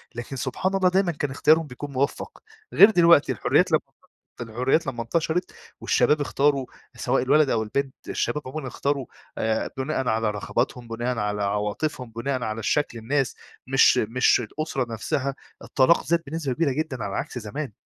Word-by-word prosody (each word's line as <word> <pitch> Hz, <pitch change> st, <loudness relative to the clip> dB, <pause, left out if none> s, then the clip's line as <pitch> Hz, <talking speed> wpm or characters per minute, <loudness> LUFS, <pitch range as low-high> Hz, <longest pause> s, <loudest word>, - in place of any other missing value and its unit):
لكن 120 Hz, +3 st, -6 dB
سبحان 135 Hz, +9 st, -2 dB
الله 185 Hz, -1 st, +3 dB
دايمًا 185 Hz, -1 st, +2 dB
كان 145 Hz, -3 st, -3 dB
اختيارهم 155 Hz, +3 st, +3 dB
بيكون 140 Hz, +3 st, -8 dB
مُوفّق، 140 Hz, -, -2 dB, 0.3 s
غير 200 Hz, +3 st, +9 dB
دلوقتي 170 Hz, -6 st, +5 dB
الحريات -, -, +2 dB
لمّا -, -, +4 dB, 0.6 s
الحريات 125 Hz, +7 st, 0 dB
لمّا 120 Hz, -3 st, -3 dB
انتشرت 165 Hz, +7 st, -1 dB, 0.3 s
والشباب 150 Hz, 0 st, +2 dB
اختاروا 140 Hz, -2 st, +1 dB, 0.3 s
سواء 125 Hz, 0 st, 0 dB
الولد 150 Hz, +2 st, +4 dB
أو 110 Hz, -3 st, +1 dB
البنت، 135 Hz, +5 st, -2 dB
الشباب 150 Hz, -, -1 dB
عمومًا 135 Hz, 0 st, -5 dB
اختارو 140 Hz, 0 st, -2 dB, 0.3 s
آآ، 110 Hz, 0 st, -1 dB
بُناءً 135 Hz, -1 st, -2 dB
على 110 Hz, -1 st, +1 dB
رغباتهم، 120 Hz, +3 st, -2 dB
بُناءً 120 Hz, +1 st, -3 dB
على 105 Hz, -1 st, -1 dB
عواطفهم، 105 Hz, +6 st, -2 dB
بُناءً 125 Hz, +3 st, -3 dB
على 110 Hz, 0 st, -3 dB
الشكل 120 Hz, +2 st, 0 dB
الناس 135 Hz, +3 st, -1 dB, 0.3 s
مش 135 Hz, -1 st, +5 dB
مش 120 Hz, +3 st, +3 dB
الأسرة 130 Hz, 0 st, -3 dB
نفسها، 135 Hz, +4 st, -2 dB, 0.3 s
الطلاق 135 Hz, +5 st, +3 dB
زاد 170 Hz, +1 st, +1 dB
بنسبة 150 Hz, -3 st, -3 dB
كبيرة 150 Hz, +1 st, +1 dB
جدًا 135 Hz, -4 st, -3 dB
على 100 Hz, -1 st, -4 dB
عكس -, -, -4 dB
زمان. 115 Hz, +2 st, -6 dB
130 Hz, 160 wpm, -24 LUFS, 115-150 Hz, 0.6 s, غير